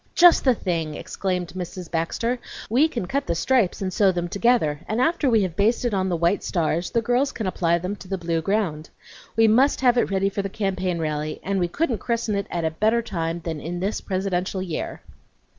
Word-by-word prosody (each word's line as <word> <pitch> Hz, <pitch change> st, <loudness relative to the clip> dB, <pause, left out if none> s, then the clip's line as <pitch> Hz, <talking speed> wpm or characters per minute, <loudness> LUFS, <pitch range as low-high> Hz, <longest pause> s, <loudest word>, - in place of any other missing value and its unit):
"Just 350 Hz, -1 st, +7 dB
the 255 Hz, -2 st, +5 dB
thing!" 165 Hz, -7 st, -2 dB
exclaimed 180 Hz, 0 st, -3 dB
Mrs. 180 Hz, -1 st, -6 dB
Baxter. 230 Hz, +9 st, -1 dB, 0.3 s
"We 270 Hz, +7 st, +5 dB
can 240 Hz, -, -4 dB
cut 280 Hz, +9 st, -2 dB
the 170 Hz, -, 0 dB
stripes 215 Hz, -1 st, +1 dB
and 185 Hz, -1 st, -2 dB
sew 195 Hz, 0 st, +4 dB
them 175 Hz, -1 st, -3 dB
together, 200 Hz, -8 st, +2 dB
and 215 Hz, +2 st, -1 dB
after 320 Hz, 0 st, +2 dB
we 225 Hz, -4 st, +4 dB
have 180 Hz, -3 st, -3 dB
basted 230 Hz, +4 st, +1 dB
on 190 Hz, -1 st, +1 dB
the 175 Hz, -, 0 dB
white 170 Hz, +4 st, +1 dB
stars 170 Hz, -1 st, 0 dB
the 230 Hz, -, 0 dB
girls 245 Hz, +5 st, +1 dB
can 220 Hz, -, -4 dB
apply 170 Hz, -2 st, +1 dB
them 185 Hz, +4 st, -3 dB
to 185 Hz, -, -12 dB
the 195 Hz, +1 st, -2 dB
blue 170 Hz, -2 st, -1 dB
ground. 165 Hz, -5 st, -1 dB, 0.5 s
We 225 Hz, 0 st, +5 dB
must 260 Hz, +7 st, +4 dB
have 245 Hz, -2 st, +4 dB
it -, -, +1 dB
ready 195 Hz, 0 st, +1 dB
for 200 Hz, -, -2 dB
the 195 Hz, -, -4 dB
campaign 190 Hz, -3 st, -1 dB
rally, 155 Hz, -1 st, -2 dB
and 195 Hz, 0 st, -1 dB
we 175 Hz, -, +1 dB
couldn't 245 Hz, -, -1 dB
christen 230 Hz, 0 st, -1 dB
it 200 Hz, -1 st, -1 dB
at 170 Hz, -2 st, -2 dB
a 160 Hz, -, +1 dB
better 220 Hz, +8 st, +1 dB
time 170 Hz, -5 st, -3 dB
than 160 Hz, -2 st, -4 dB
in 175 Hz, +2 st, -4 dB
this 195 Hz, +4 st, -2 dB
presidential 190 Hz, -1 st, -2 dB
year." 170 Hz, -4 st, -4 dB
190 Hz, 215 wpm, -24 LUFS, 170-230 Hz, 0.5 s, Just